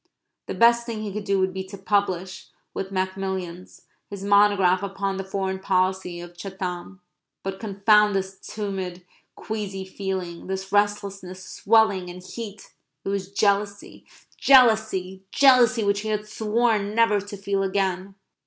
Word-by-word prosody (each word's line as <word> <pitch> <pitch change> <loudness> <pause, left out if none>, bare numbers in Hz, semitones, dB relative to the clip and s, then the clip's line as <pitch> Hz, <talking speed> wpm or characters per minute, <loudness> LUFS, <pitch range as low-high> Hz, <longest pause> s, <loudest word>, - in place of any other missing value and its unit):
The - - -4
best 235 0 +5
thing 220 -2 -4
he 205 -2 -5
could 210 0 -5
do 200 -1 +1
would 190 0 +1
be 190 0 -4
to 195 +1 -10
publish, 190 -2 -1 0.3
with 190 - -4
Macmillans, 185 -2 -4 0.3
his 200 -1 -7
monograph 200 -2 +4
upon 195 0 -3
the 195 - -3
foreign 190 0 -3
policy 185 -2 0
of 175 0 -10
Chatham. 185 0 -6 0.4
But 195 0 -4
confound 210 0 +3
this 190 0 -3
tumid, 190 -4 -5 0.3
queasy 200 -3 -5
feeling 190 -3 -5
this 190 0 -4
restlessness, 200 -2 -1
swelling, 205 -4 +2
and 180 +1 -9
heat 210 0 -8 0.3
it - - -2
was 195 -1 -3
jealousy! 200 0 -1 0.3
jealousy! 220 -8 +4
jealousy! 250 -4 +5
which 200 0 +1
he 220 +1 -4
had 210 0 -1
sworn 215 -1 0
never 225 -3 +3
to 205 +1 -8
feel 195 0 -1
again. 190 0 -1
195 Hz, 145 wpm, -24 LUFS, 190-210 Hz, 0.4 s, best